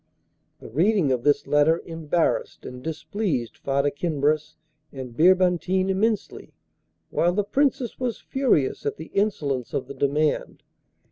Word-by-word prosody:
The - - -12
reading 175 - +2
of 125 -2 +1
this 145 +1 +2
letter 150 +3 +3
embarrassed 165 0 -1
and 125 0 -8
displeased 160 - -3
Farda 140 +1 +1
Kinbras 150 -1 -1 0.4
and 130 -3 -8
Birbantine 185 +3 +3
immensely, 210 +2 -2 0.6
while 175 +1 +2
the 205 +2 +1
Princess 265 +2 0
was 250 -3 -2
furious 250 - 0
at - - -2
the 160 - -10
insolence 145 - -1
of - - -1
the - - -7
demand. 145 +3 0
160 Hz, 130 wpm, -24 LUFS, 140-190 Hz, 0.6 s, letter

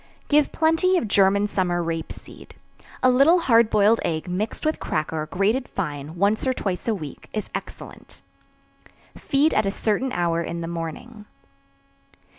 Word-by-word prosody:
Give 295 -1 +3
plenty 325 +4 +2
of 230 - -1
German 200 0 +3
summer 180 -4 -1
rape 165 -1 -4
seed. - - -13 0.5
A 255 - +6
little 275 +8 +5
hard 230 -7 +4
boiled 215 +2 +4
egg 160 +1 -2
mixed 195 +10 -3
with 310 - 0
cracker, 155 0 -3
grated 210 - 0
fine, 150 -4 -5
once 200 +7 +1
or 260 - +1
twice 190 -2 -4
a 225 - +1
week, 155 -7 -9
is 215 - -4
excellent. - - -9 0.9
Feed 300 -1 +1
at 215 -1 +1
a - - +2
certain 220 +6 -1
hour 170 -3 0
in 170 0 -5
the 165 - -4
morning. 170 +7 -7
200 Hz, 155 wpm, -23 LUFS, 170-250 Hz, 0.9 s, A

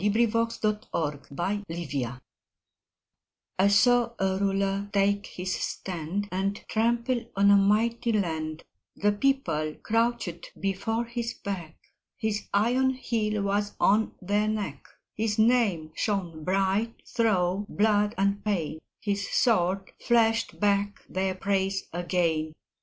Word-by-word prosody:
VERSE: 230 +2 +2
THE 210 -1 +1 0.5
THREE 190 +8 -1
RULERS 140 -8 -3 1.4
I 195 - +5
saw 235 +3 +4
a 190 0 +1
Ruler 195 0 0
take 200 0 +2
his 185 +1 -4
stand 185 +3 -3
And 195 +2 0
trample 235 +2 +1
on 200 +1 +5
a - - +8
mighty 230 +4 +2
land; 160 -6 -2 0.3
The 205 0 +2
People 205 - 0
crouched 230 -6 -1
before 225 +4 -1
his 235 0 -4
beck, 175 -6 -6 0.4
His 215 -1 -2
iron 250 +6 +2
heel 215 -5 -1
was 205 +1 -1
on 215 +2 +3
their 205 +3 +1
neck, 205 -10 -3 0.3
His 215 0 -1
name 215 -9 +3
shone 175 -7 -2
bright 195 +4 0
through 200 -3 +1
blood 210 +1 +2
and 200 +1 +1
pain, 170 -7 -1 0.2
His 200 -1 -2
sword 195 -4 +2
flashed 230 -1 +2
back 205 0 +1
their 190 0 -1
praise 195 0 0
again. 165 -3 0
200 Hz, 120 wpm, -27 LUFS, 185-225 Hz, 1.4 s, a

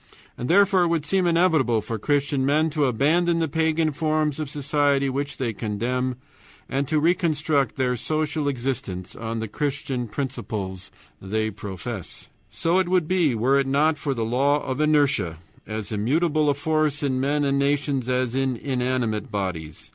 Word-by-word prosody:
And 125 - -5
therefore 195 -1 +5
it - - +2
would 165 -3 0
seem 185 +3 +1
inevitable 160 -9 +3
for 110 +1 -4
Christian 140 +2 +1
men 155 +4 +2
to 150 -1 +1
abandon 160 +8 +2
the 165 -1 +1
pagan 160 +1 +1
forms 155 -1 0
of 155 -3 -3
society 145 -1 +1
which 140 +2 -3
they 120 -4 -2
condemn, 125 +5 -2 0.5
and 140 +1 -1
to 155 - +2
reconstruct 155 -5 +1
their 125 -2 0
social 155 +3 -1
existence 120 -9 -3
on 115 0 -4
the 110 0 -3
Christian 135 0 -3
principles 105 -6 -4 0.3
they 110 +3 -1
profess. 100 0 -7 0.2
So 170 +3 +1
it 185 -2 0
would 180 -4 +2
be 170 -8 +2
were 130 +5 +3
it 135 - 0
not 150 +3 +2
for 140 -3 -2
the 115 -2 -1
law 140 +5 +2
of 130 +3 -2
inertia, 140 - +2 0.3
as 110 -1 -4
immutable 150 +8 +1
a 140 - +2
force 155 0 0
in 130 -2 0
men 145 +2 +1
and 140 0 +1
nations 140 -2 0
as 125 -1 0
in 135 -1 0
inanimate 125 -4 -1
bodies. 90 -6 -4
140 Hz, 165 wpm, -24 LUFS, 120-155 Hz, 0.5 s, therefore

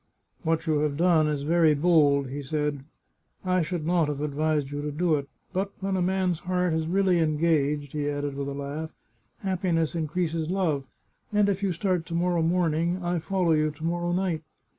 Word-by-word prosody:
" - - -42
What 165 0 0
you 155 -3 +2
have 145 -1 0
done 165 -2 +4
is 145 -2 -1
very 160 0 +4
bold," 145 -4 +3
he 140 +2 -4
said. 150 -1 -2 0.3
" - - -50 0.3
I 185 0 +2
should 165 -1 -3
not 170 -2 +2
have 145 -1 -3
advised 150 -1 0
you 145 0 -3
to 150 0 -3
do 165 +3 +1
it. 140 -2 -1 0.2
But 195 +1 -1
when 195 0 -1
a 185 - 0
man's 185 -2 +1
heart 180 -1 0
is 160 0 -1
really 185 0 +2
engaged," 150 -3 +1
he 145 -1 -1
added 145 -1 -2
with 140 0 -4
a 140 - -3
laugh, 145 +3 -4 0.3
" 115 - -44
happiness 175 -4 0
in 165 -2 -1
creases 165 -1 -1
love, 165 -8 0 0.5
and 210 -1 +3
if 200 -1 0
you 195 -2 +1
start 180 -1 -1
to 170 - -4
morrow 175 0 +1
morning, 170 +1 +1
I 175 0 0
follow 180 0 0
you 155 -1 +3
to 155 +1 -10
morrow 175 +1 -1
night 175 -3 0
160 Hz, 205 wpm, -26 LUFS, 150-180 Hz, 0.5 s, done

